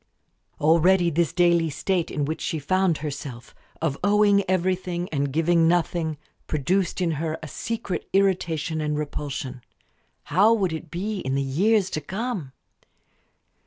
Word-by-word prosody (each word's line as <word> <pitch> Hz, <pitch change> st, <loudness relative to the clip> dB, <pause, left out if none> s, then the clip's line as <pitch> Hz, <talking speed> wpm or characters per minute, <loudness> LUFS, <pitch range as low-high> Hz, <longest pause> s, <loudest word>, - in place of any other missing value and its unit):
Already 170 Hz, +3 st, +4 dB
this 165 Hz, -1 st, +1 dB
daily 170 Hz, -2 st, +3 dB
state 175 Hz, +4 st, -1 dB
in 145 Hz, -, -1 dB
which 155 Hz, +2 st, -4 dB
she 160 Hz, -, -2 dB
found 185 Hz, +2 st, +1 dB
herself 140 Hz, -5 st, -7 dB, 0.3 s
of 145 Hz, -4 st, -1 dB
owing 205 Hz, 0 st, +4 dB
everything 185 Hz, -1 st, 0 dB
and 140 Hz, -2 st, -1 dB
giving 165 Hz, +2 st, +3 dB
nothing 165 Hz, -2 st, 0 dB, 0.3 s
produced 180 Hz, +6 st, 0 dB
in 170 Hz, -2 st, +1 dB
her 160 Hz, -1 st, -2 dB
a -, -, -5 dB
secret 220 Hz, -, -4 dB
irritation 170 Hz, -5 st, +1 dB
and 150 Hz, -1 st, -1 dB
repulsion; 140 Hz, -3 st, -4 dB, 0.6 s
how 205 Hz, +9 st, +4 dB
would 190 Hz, -6 st, 0 dB
it 160 Hz, 0 st, -6 dB
be 195 Hz, +5 st, -3 dB
in 135 Hz, -5 st, -2 dB
the 140 Hz, -, +1 dB
years 190 Hz, +9 st, +2 dB
to 155 Hz, -, -2 dB
come? 195 Hz, -, -4 dB
170 Hz, 140 wpm, -24 LUFS, 150-190 Hz, 0.6 s, Already